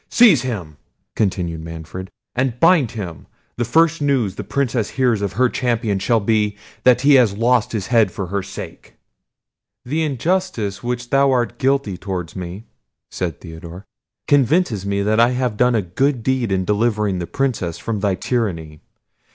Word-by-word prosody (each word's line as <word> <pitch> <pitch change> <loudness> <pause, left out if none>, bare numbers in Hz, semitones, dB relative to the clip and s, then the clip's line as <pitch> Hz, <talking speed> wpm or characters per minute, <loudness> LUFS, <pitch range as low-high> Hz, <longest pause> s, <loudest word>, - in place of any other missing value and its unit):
Seize 215 - +6
him," 90 - -5 0.4
continued 90 -6 -1
Manfred, 80 +3 -8 0.2
"and 125 -1 -1
bind 165 -7 +5
him—the 95 - -7
first 165 +5 +3
news 135 -9 +1
the - - -6
Princess 125 -5 -1
hears 125 -5 +1
of 100 -2 -2
her 125 +6 +3
champion 115 -5 -1
shall 115 +4 +2
be, 105 -1 0 0.3
that 125 -1 +5
he 145 +1 +5
has 105 -5 0
lost 120 0 +2
his 105 -5 -3
head 110 -3 +3
for 95 - -4
her 100 +3 -2
sake." - - -9 0.9
"The 150 +6 -1
injustice 150 - -1
of - - -13
which 120 0 -3
thou 140 0 +4
art 120 -2 0
guilty 135 -8 0
towards 90 -4 -5
me," 95 +4 -7 0.5
said 85 -5 -3
Theodore, 85 +3 -10 0.4
"convinces 135 - +2
me 100 0 0
that 110 +2 +1
I 120 +2 +4
have 125 -3 -1
done 125 +2 +3
a 110 - +1
good 120 +8 0
deed 130 -4 0
in 95 -1 0
delivering 105 -2 0
the 85 - -4
Princess 110 - -2
from 110 +3 -3
thy 100 -2 +1
tyranny. 85 -11 -3
110 Hz, 165 wpm, -20 LUFS, 95-130 Hz, 0.9 s, Seize